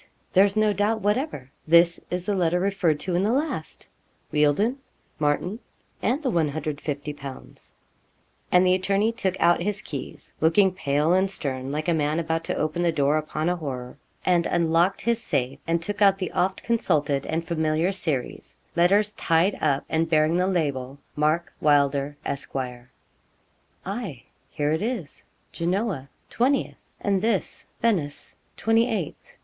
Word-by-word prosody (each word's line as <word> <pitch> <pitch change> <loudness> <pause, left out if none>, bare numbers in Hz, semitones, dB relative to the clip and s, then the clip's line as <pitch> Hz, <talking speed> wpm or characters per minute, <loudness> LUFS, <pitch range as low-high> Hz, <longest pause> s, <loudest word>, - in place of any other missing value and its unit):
There's 200 +1 +5
no 215 -1 +3
doubt 210 +2 0
whatever 205 - -1 0.2
this 170 +1 +5
is 180 0 -3
the 205 - 0
letter 175 -2 +1
referred 185 -5 +1
to 180 - -3
in 175 - +2
the 205 +3 +2
last 270 - -2 0.5
Wealdon, 150 - +2 0.4
Martin, 155 +8 0 0.4
and 280 +6 0
the 260 - +1
150_l._' 145 -3 -4 0.8
And 180 +1 +5
the 180 - +4
attorney 195 +4 +1
took 190 -5 -2
out 175 0 +4
his 205 +2 -2
keys, 140 -4 -8
looking 185 +5 +4
pale 150 -1 +1
and 190 +1 +3
stern, 135 -7 -4
like 155 +3 -3
a 170 - +3
man 155 0 +1
about 165 0 -1
to - - -2
open 155 +3 -1
the 170 -1 +3
door 145 -1 +2
upon 155 +1 -3
a 180 - +2
horror, 130 -5 -6 0.3
and 175 -2 +3
unlocked 170 +3 +2
his 235 -1 +1
safe, 135 - -1
and 165 0 0
took 205 +3 -4
out 195 -1 +6
the 190 - -3
oft 185 +1 0
consulted 145 - 0
and 165 +1 -2
familiar 160 +2 +1
series 155 -10 -3 0.2
letters 200 +5 +3
tied 165 +4 +2
up 140 -3 +1
and 165 0 0
bearing 155 0 +3
the 180 +1 +2
label, 140 -7 -1 0.2
'Mark 155 +3 +1
Wylder, 145 -1 +2
Esq.' 140 0 -4 1.3
'Aye, 195 - -5 0.3
here 145 0 -1
it 160 - 0
is, 215 - -4 0.3
Genoa, 175 - -2 0.2
20th, 265 +4 0
and 200 -2 +1
this, 220 -3 -1 0.2
Venice, 170 -11 -1 0.2
28th. 225 -6 0
170 Hz, 150 wpm, -25 LUFS, 150-195 Hz, 1.3 s, out